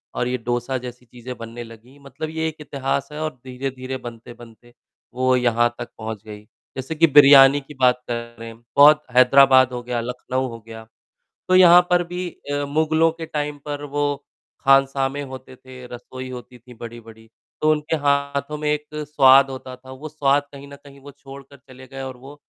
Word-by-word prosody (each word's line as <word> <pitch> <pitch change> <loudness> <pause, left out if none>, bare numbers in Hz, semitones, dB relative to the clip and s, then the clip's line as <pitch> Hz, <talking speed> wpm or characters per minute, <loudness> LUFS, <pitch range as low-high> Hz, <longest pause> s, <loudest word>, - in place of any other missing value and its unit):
और 125 - -1
ये 125 0 -2
डोसा 120 +2 -3
जैसी 125 0 -10
चीज़ें 125 +2 -10
बनने 115 +1 -8
लगीं। 115 +5 -16
मतलब 140 +3 -7
ये 160 0 -3
एक 160 - -5
इतिहास 140 -1 -3
है 150 - -7
और 155 - -2
धीरे-धीरे 130 0 -6
बनते-बनते, 120 0 -13 0.4
वो 130 0 +1
यहाँ 120 -1 +2
तक 120 - -7
पहुँच 110 -1 -7
गई। 105 -1 -10 0.4
जैसे 135 +5 -5
कि 165 +2 +4
बिरयानी 140 -1 +7
की 145 +2 -14
बात 125 0 +3
करें, 115 -1 -7 0.2
बहुत 150 +1 +7
हैदराबाद 130 0 +6
हो 120 - -4
गया, 120 -1 -3
लखनऊ 125 +2 -4
हो 115 -1 -9
गया। 110 0 -10 0.6
तो 185 - +3
यहाँ 180 -1 +8
पर 180 0 +3
भी 180 0 -5 0.2
अ, 145 0 -1
मुगलों 160 +2 +1
के 165 0 -8
टाइम 150 -1 -4
पर 145 0 -5
वो 145 0 -2 0.6
खानसामे 135 0 +2
होते 130 0 -11
थे, 130 -1 -13
रसोई 130 +1 -9
होती 125 0 -10
थीं, 125 +2 -16
बड़ी-बड़ी। 115 -1 -12 0.3
तो 155 0 +3
उनके 150 +1 -1
हाथों 140 +1 -1
में 150 0 -2
एक 150 0 -3
स्वाद 140 -3 +4
होता 130 -1 -8
था, 130 +1 -15
वो 145 +4 -9
स्वाद, 145 -1 +1
कहीं 140 0 -11
न 140 - -11
कहीं, 140 -1 -16
वो 145 +1 -13
छोड़कर 140 0 -14
चले 130 0 -16
गए 135 0 -9
और 130 -1 -7
वो 135 +3 -13
130 Hz, 185 wpm, -21 LUFS, 125-145 Hz, 0.6 s, यहाँ